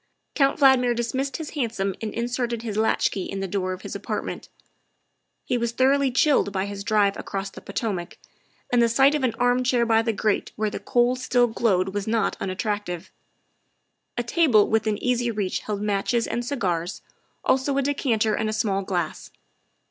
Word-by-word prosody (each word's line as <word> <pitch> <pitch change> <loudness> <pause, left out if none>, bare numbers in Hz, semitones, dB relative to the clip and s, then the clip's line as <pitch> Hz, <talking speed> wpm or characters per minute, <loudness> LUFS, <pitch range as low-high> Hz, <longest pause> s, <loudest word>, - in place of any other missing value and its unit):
Count 275 +1 +2
Valdmir 255 -3 +5
dismissed 260 +4 -2
his 320 -2 -6
hansom 220 -9 -1
and 220 -1 -3
inserted 240 -1 -2
his 220 -3 -4
latchkey 215 -2 +1
in 195 - -5
the 195 - -2
door 185 0 -2
of 185 0 -6
his - - -6
apartment. - - -4 1.0
He 250 -1 0
was 235 0 -1
thor 260 +3 +4
oughly 280 -2 +1
chilled 270 -4 +3
by 190 0 -1
his 200 0 -6
drive 205 -2 +2
across 195 0 -4
the - - -11
Potomac, 190 -7 -4 0.6
and 245 - +5
the 235 - +4
sight 270 +5 +4
of 295 -3 -1
an 235 -3 +1
armchair 245 0 +2
by 225 -1 +4
the 225 0 0
grate 215 -1 -1
where 215 -1 -1
the - - -4
coals 250 0 +1
still 245 -1 +3
glowed 195 -5 +1
was 205 0 -3
not 225 0 +1
unattractive. 190 -2 -3 1.1
A 240 - 0
table 240 -5 +4
within 220 -1 +1
easy 245 0 0
reach 205 -4 -1
held 210 -1 -4
matches 210 +3 0
and 240 - -2
cigars, 185 - -2 0.4
also 270 +1 +2
a 275 - +2
decanter 235 -6 +1
and 220 0 -1
a - - -2
small 205 -3 0
glass. 180 -5 -3
225 Hz, 180 wpm, -24 LUFS, 200-250 Hz, 1.1 s, Valdmir